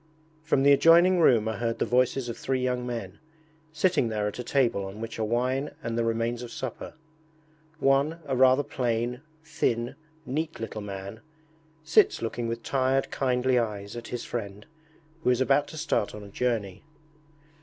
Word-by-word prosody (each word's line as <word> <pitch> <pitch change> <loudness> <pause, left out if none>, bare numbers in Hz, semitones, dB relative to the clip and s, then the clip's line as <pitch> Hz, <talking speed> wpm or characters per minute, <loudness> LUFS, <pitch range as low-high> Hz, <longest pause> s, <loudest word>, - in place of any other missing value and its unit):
From 155 -3 +1
the 140 - +6
adjoining 170 +5 +6
room 120 -9 +4
are 110 -2 -2
heard 115 0 -1
the - - 0
voices 125 +1 +1
of 120 - -4
three 130 +1 -2
young 125 -1 -1
men, 115 -6 -5 0.5
sitting 160 -4 +2
there 105 -2 -1
at 105 - -5
a - - -3
table 120 -7 +1
on 95 +2 -7
which 115 0 -6
are - - 0
wine 125 +5 0
and 115 - -3
the 115 - +1
remains 115 +1 -1
of 120 -1 -8
supper. 130 +2 -6 0.8
One, 140 +2 +2
a 135 - -1
rather 130 +2 +5
plain, 120 -1 -2 0.2
thin, 120 -6 -1 0.3
neat 155 +5 -3
little 110 -1 -5
man, 100 +1 -7 0.6
sits 160 +1 +4
looking 115 +1 -3
with 115 0 -4
tired 135 0 0
kindly 125 -1 +1
eyes 105 -2 -4
at 120 -1 -7
his 120 - -5
friend, 105 -3 -5 0.6
who - - +2
is 125 -1 +3
about 135 +2 +3
to 155 - -9
start 150 -10 -1
on 105 - -9
a 100 - -11
journey. 105 -4 -2
120 Hz, 175 wpm, -27 LUFS, 115-135 Hz, 0.8 s, the